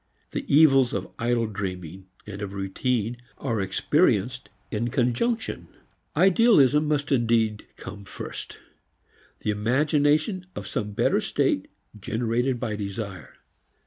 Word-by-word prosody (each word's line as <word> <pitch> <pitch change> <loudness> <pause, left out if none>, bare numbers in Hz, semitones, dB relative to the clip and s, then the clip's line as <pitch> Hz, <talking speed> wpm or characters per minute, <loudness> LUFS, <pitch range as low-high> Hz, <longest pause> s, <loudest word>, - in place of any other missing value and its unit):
The - - -4
evils 135 -4 +6
of 95 -1 -3
idle 120 0 +1
dreaming 95 -3 -6 0.2
and 100 -1 -7
of 100 -1 -5
routine 110 +4 -1 0.2
are 115 -6 -1
experienced 125 - +1 0.2
in 115 +2 -1
conjunction. 125 - -1 0.5
"Idealism" 170 - +5
must 145 -1 0
indeed 115 -4 +1
come 100 -1 -9
first - - -7 0.8
the 105 - 0
imagination 150 - +1
of 100 - -6
some 105 +2 -3
better - - +2
state - - 0 0.3
generated 120 +4 -1
by 110 -2 -2
desire. 100 -2 -6
115 Hz, 115 wpm, -25 LUFS, 105-140 Hz, 0.8 s, evils